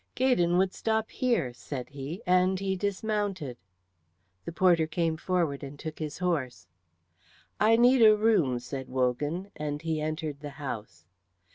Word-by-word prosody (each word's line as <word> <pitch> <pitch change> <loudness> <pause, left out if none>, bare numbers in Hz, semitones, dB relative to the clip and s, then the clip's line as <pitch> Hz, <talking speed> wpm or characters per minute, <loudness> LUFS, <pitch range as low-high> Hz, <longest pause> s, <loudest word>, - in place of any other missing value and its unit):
"Gaydon 180 -10 +3
would 190 0 +2
stop 220 -1 -1
here," 235 - 0
said 125 +1 -7
he, 145 +8 -7
and 185 +1 +3
he 190 -1 -1
dismounted. 200 - -2 0.9
The - - -4
porter 170 -2 +3
came 165 0 0
forward 165 -4 -1
and 140 +1 -8
took 155 +1 -7
his 150 -2 -4
horse. 155 - -2 0.9
"I 220 +2 +5
need 245 +2 +5
a 215 -1 +7
room," 205 - +3
said 130 +2 -6
Wogan, 145 +9 -1
and 150 0 -4
he 160 -2 -1
entered 155 -2 -3
the 145 0 -7
house. 105 - -6
165 Hz, 145 wpm, -28 LUFS, 145-195 Hz, 0.9 s, a